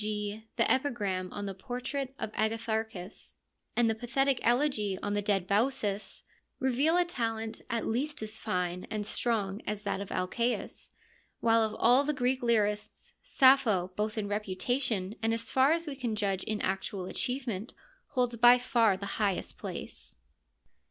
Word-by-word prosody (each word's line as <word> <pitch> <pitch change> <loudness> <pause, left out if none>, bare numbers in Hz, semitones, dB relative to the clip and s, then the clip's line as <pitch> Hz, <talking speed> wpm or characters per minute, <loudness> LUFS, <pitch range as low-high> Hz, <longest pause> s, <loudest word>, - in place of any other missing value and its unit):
g., 210 +1 -3
the - - +3
epigram 205 -9 0
on 205 - -5
the 195 - -3
portrait 250 +6 -4
of 215 - -4
Agatharchis 220 -3 -2 0.4
and 240 -1 +4
the 225 - +3
pathetic 250 +4 +1
elegy 240 -6 +2
on 205 - -1
the 205 - +1
dead 200 -3 +1
Baucis, 210 0 0 0.4
reveal 275 +5 +2
a 355 - +4
talent 225 -8 -3
at 230 -1 -1
least 285 +7 0
as 220 0 -4
fine 180 -4 -2
and 210 -1 -2
strong 210 -2 -1
as 210 0 -3
that 200 -1 -2
of 200 - -7
Alcaeus; 230 +7 -2 0.4
while 230 0 +4
of 220 -1 0
all 250 +4 +5
the 300 +1 -1
Greek 260 0 +1
lyrists, 210 -3 0
Sappho, 235 -9 +4
both 215 +1 -2
in 210 -2 -1
reputation 205 +1 -1
and 225 0 +2
as 230 - -4
far 265 +2 +5
as 335 +1 +1
we 290 -3 -5
can 245 -5 -2
judge 195 -3 -1
in 215 -1 -2
actual 190 0 -2
achievement, 245 -1 -3 0.3
holds 245 -3 0
by 240 +2 +8
far 230 -5 +3
the 200 - -6 0.2
highest 200 -3 -1
place. - - -5
220 Hz, 160 wpm, -30 LUFS, 205-250 Hz, 0.4 s, by